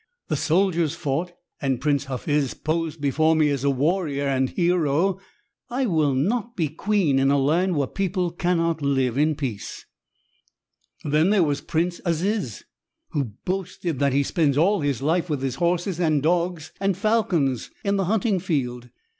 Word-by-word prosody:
The -, -, +1 dB
soldiers 170 Hz, -2 st, +1 dB
fought 170 Hz, +1 st, -2 dB, 0.3 s
and 135 Hz, -4 st, 0 dB
Prince 140 Hz, 0 st, +1 dB
Hafiz 140 Hz, +1 st, -1 dB
posed 160 Hz, 0 st, -2 dB
before 155 Hz, +3 st, +2 dB
me 155 Hz, -2 st, +3 dB
as 140 Hz, -2 st, -2 dB
a 140 Hz, -, +3 dB
warrior 145 Hz, +1 st, 0 dB
and 130 Hz, -1 st, +1 dB
hero. 175 Hz, +1 st, +1 dB, 0.5 s
I 255 Hz, +2 st, 0 dB
will 155 Hz, -, +2 dB
not 225 Hz, -, -1 dB
be 160 Hz, -5 st, 0 dB
queen 165 Hz, -3 st, +1 dB
in 135 Hz, 0 st, +3 dB
a 140 Hz, -, +3 dB
land 165 Hz, +7 st, +2 dB
where 145 Hz, -2 st, +1 dB
people 185 Hz, +2 st, -1 dB
cannot 165 Hz, -2 st, 0 dB
live 135 Hz, -4 st, +1 dB
in 150 Hz, +2 st, +2 dB
peace. 125 Hz, -8 st, -5 dB, 1.2 s
"Then 155 Hz, +5 st, +2 dB
there 205 Hz, -3 st, +4 dB
was 145 Hz, -3 st, 0 dB
Prince 170 Hz, +2 st, -1 dB
Aziz 170 Hz, -, -1 dB, 0.5 s
who 145 Hz, -3 st, -1 dB, 0.2 s
boasted 180 Hz, -5 st, -3 dB
that 140 Hz, -2 st, +2 dB
he 140 Hz, +1 st, +3 dB
spends 145 Hz, -2 st, +1 dB
all 190 Hz, +5 st, +3 dB
his 140 Hz, -3 st, -1 dB
life 165 Hz, +4 st, +1 dB
with 145 Hz, -3 st, -2 dB
his 130 Hz, -2 st, -2 dB
horses 175 Hz, +1 st, 0 dB
and 155 Hz, -5 st, +2 dB
dogs 170 Hz, -1 st, 0 dB
and 195 Hz, -2 st, +1 dB
falcons 180 Hz, -, +1 dB
in 200 Hz, 0 st, +1 dB
the 195 Hz, -, 0 dB
hunting 210 Hz, 0 st, +1 dB
field. 125 Hz, -8 st, -2 dB
160 Hz, 165 wpm, -24 LUFS, 140-180 Hz, 1.2 s, there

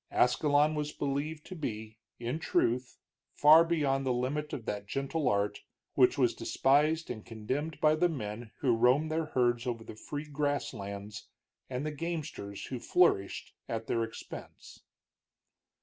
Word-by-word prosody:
Ascalon 145 Hz, +4 st, +3 dB
was 150 Hz, -1 st, -2 dB
believed 150 Hz, +3 st, -3 dB
to 185 Hz, -, -8 dB
be, 110 Hz, -7 st, -5 dB, 0.2 s
in 120 Hz, +6 st, -2 dB
truth, 125 Hz, -4 st, 0 dB, 0.4 s
far 155 Hz, +3 st, +8 dB
beyond 145 Hz, -5 st, +1 dB
the 130 Hz, -, +1 dB
limit 135 Hz, +5 st, -1 dB
of 115 Hz, -, -5 dB
that 100 Hz, -1 st, -4 dB
gentle 135 Hz, +3 st, -1 dB
art, 100 Hz, -1 st, 0 dB, 0.3 s
which -, -, +4 dB
was -, -, +3 dB
despised 150 Hz, +4 st, +2 dB
and 110 Hz, -3 st, -6 dB
contemned 130 Hz, +8 st, -4 dB
by 155 Hz, 0 st, +5 dB
the 175 Hz, +3 st, +3 dB
men 115 Hz, -6 st, -5 dB
who 125 Hz, -4 st, +3 dB
roamed 130 Hz, +7 st, +3 dB
their 160 Hz, 0 st, 0 dB
herds 120 Hz, -4 st, +1 dB
over 115 Hz, -2 st, -3 dB
the -, -, -9 dB
free 145 Hz, +7 st, -6 dB
grass 145 Hz, -1 st, -1 dB
lands, 100 Hz, -1 st, -7 dB, 0.4 s
and 130 Hz, +2 st, -3 dB
the 155 Hz, -, -1 dB
gamesters 150 Hz, -, -5 dB
who 130 Hz, -, -5 dB
flourished 115 Hz, -, +2 dB, 0.2 s
at 115 Hz, -1 st, -3 dB
their 115 Hz, 0 st, 0 dB
expense. 115 Hz, 0 st, -9 dB
135 Hz, 150 wpm, -31 LUFS, 115-150 Hz, 0.4 s, far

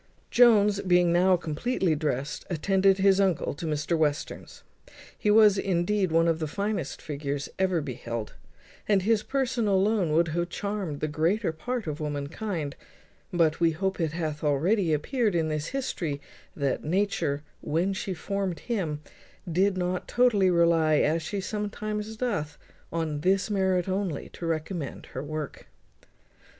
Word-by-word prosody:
Jones, 210 Hz, -4 st, +5 dB
being 180 Hz, -2 st, +3 dB
now 180 Hz, +1 st, +4 dB
completely 175 Hz, +3 st, -1 dB
dressed, 150 Hz, -1 st, -2 dB
attended 190 Hz, +3 st, +3 dB
his 195 Hz, 0 st, +4 dB
uncle 190 Hz, -5 st, +1 dB
to 160 Hz, +4 st, -6 dB
Mr 155 Hz, +2 st, 0 dB
Western's. 150 Hz, -2 st, -2 dB, 0.5 s
He 210 Hz, -, -1 dB
was, 210 Hz, -2 st, +6 dB
indeed, 190 Hz, 0 st, +1 dB
one 165 Hz, +1 st, +4 dB
of 165 Hz, -1 st, +1 dB
the 155 Hz, -, -2 dB
finest 200 Hz, -2 st, -3 dB
figures 145 Hz, -1 st, -4 dB
ever 185 Hz, -3 st, +2 dB
beheld, 115 Hz, -5 st, -5 dB, 0.5 s
and 200 Hz, -3 st, +3 dB
his 220 Hz, +1 st, +3 dB
person 255 Hz, -2 st, -1 dB
alone 195 Hz, -3 st, +2 dB
would 165 Hz, +1 st, +3 dB
have 175 Hz, +2 st, -1 dB
charmed 200 Hz, -7 st, -4 dB
the 155 Hz, -, 0 dB
greater 165 Hz, +6 st, +1 dB
part 240 Hz, +9 st, -4 dB
of 155 Hz, -1 st, -4 dB
womankind; 150 Hz, +2 st, -3 dB, 0.6 s
but 165 Hz, -3 st, +2 dB
we 165 Hz, -1 st, +3 dB
hope 190 Hz, +4 st, -2 dB
it 160 Hz, -2 st, 0 dB
hath 155 Hz, -3 st, -3 dB
already 165 Hz, +6 st, +2 dB
appeared 210 Hz, -, 0 dB
in 160 Hz, -2 st, +1 dB
this 155 Hz, 0 st, -2 dB
history 175 Hz, -, -3 dB, 0.4 s
that 140 Hz, -3 st, -1 dB
Nature, 155 Hz, -4 st, 0 dB, 0.2 s
when 175 Hz, +6 st, 0 dB
she 190 Hz, 0 st, -3 dB
formed 195 Hz, 0 st, -3 dB
him, 170 Hz, -11 st, -2 dB, 0.5 s
did 190 Hz, +3 st, +2 dB
not 180 Hz, 0 st, -2 dB
totally 220 Hz, -6 st, +3 dB
rely, 170 Hz, -3 st, +4 dB
as 155 Hz, +2 st, +2 dB
she 195 Hz, +6 st, -3 dB
sometimes 210 Hz, +1 st, -4 dB
doth, 180 Hz, -12 st, -2 dB, 0.3 s
on 160 Hz, -3 st, -2 dB
this 195 Hz, +4 st, +2 dB
merit 190 Hz, -3 st, +1 dB
only, 190 Hz, -5 st, -2 dB
to 170 Hz, -, -6 dB
recommend 160 Hz, -1 st, -3 dB
her 130 Hz, -, -3 dB
work. 150 Hz, 0 st, -6 dB
175 Hz, 145 wpm, -27 LUFS, 155-200 Hz, 0.6 s, was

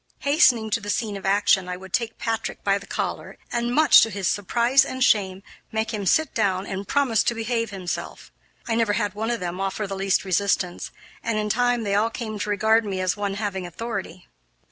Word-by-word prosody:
Hastening 250 Hz, -7 st, +3 dB
to 230 Hz, -, +1 dB
the 205 Hz, -, -7 dB
scene 210 Hz, 0 st, -1 dB
of 195 Hz, -1 st, -5 dB
action, 195 Hz, -2 st, +3 dB
I 180 Hz, -, -4 dB
would 190 Hz, 0 st, -12 dB
take 235 Hz, -2 st, -1 dB
Patrick 225 Hz, -1 st, -3 dB
by 200 Hz, 0 st, +2 dB
the 200 Hz, -, -14 dB
collar, -, -, -4 dB
and, 240 Hz, 0 st, -1 dB
much 310 Hz, +5 st, +7 dB
to 225 Hz, -, +3 dB
his 195 Hz, -3 st, -3 dB
surprise 235 Hz, +6 st, +3 dB
and 260 Hz, -1 st, -2 dB
shame, 195 Hz, -4 st, +2 dB, 0.3 s
make 220 Hz, +1 st, -2 dB
him 205 Hz, -3 st, -3 dB
sit 315 Hz, -, +2 dB
down 195 Hz, -3 st, 0 dB
and 195 Hz, 0 st, -5 dB
promise 270 Hz, -6 st, +2 dB
to 235 Hz, -, +1 dB
behave 230 Hz, 0 st, -1 dB
himself. 185 Hz, -3 st, -6 dB, 0.4 s
I 230 Hz, -, 0 dB
never 225 Hz, -2 st, +2 dB
had 205 Hz, -1 st, -1 dB
one 220 Hz, +2 st, -3 dB
of 240 Hz, -1 st, -1 dB
them 180 Hz, +1 st, -4 dB
offer 195 Hz, +2 st, -2 dB
the 195 Hz, 0 st, -5 dB
least 195 Hz, 0 st, 0 dB
resistance, 185 Hz, -1 st, 0 dB, 0.3 s
and 230 Hz, -2 st, -1 dB
in 210 Hz, 0 st, -1 dB
time 245 Hz, +1 st, +1 dB
they 200 Hz, -2 st, -1 dB
all 210 Hz, +3 st, +2 dB
came 220 Hz, -2 st, -6 dB
to 210 Hz, -, -3 dB
regard 220 Hz, +2 st, +3 dB
me 195 Hz, -3 st, -3 dB
as 185 Hz, -1 st, 0 dB
one 200 Hz, -1 st, -3 dB
having 200 Hz, -3 st, -3 dB
authority. 190 Hz, -2 st, -6 dB
210 Hz, 210 wpm, -24 LUFS, 195-230 Hz, 0.4 s, much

